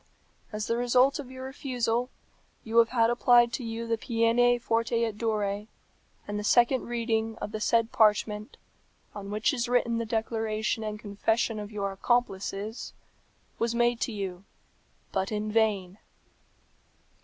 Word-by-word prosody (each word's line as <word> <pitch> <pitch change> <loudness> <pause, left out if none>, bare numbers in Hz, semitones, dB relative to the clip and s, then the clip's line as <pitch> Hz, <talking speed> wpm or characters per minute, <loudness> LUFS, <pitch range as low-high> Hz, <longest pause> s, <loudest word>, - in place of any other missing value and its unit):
As 215 0 -3
the 230 - 0
result 250 +3 +3
of 270 -3 -7
your 260 0 -8
refusal, 250 -3 -1 0.5
you 225 +1 -2
have 230 - +5
had 230 -2 +3
applied 240 0 +4
to 255 - -3
you 230 0 -4
the 230 -1 -1
peine 240 +1 +3
forte 230 0 0
et 225 -2 -1
dure; 210 -2 -1 0.6
and 205 0 -3
the - - -4
second 240 +4 +3
reading 225 -2 -1
of - - -5
the 215 - -4
said 230 +1 +2
parchment, 215 -2 +2 0.6
on 200 -1 -7
which 210 +6 +1
is 240 -2 -2
written 235 -2 +2
the 230 - -2
declaration 220 -1 -1
and 215 0 -4
confession 220 +2 -1
of 210 0 -7
your 200 -2 -2
accomplices, 205 0 -2 0.7
was 230 0 0
made 240 0 +2
to 245 - -1
you, 195 -3 -5 0.7
but 190 +1 -1
in 215 0 -2
vain. 210 -4 +1
225 Hz, 150 wpm, -28 LUFS, 210-240 Hz, 0.7 s, have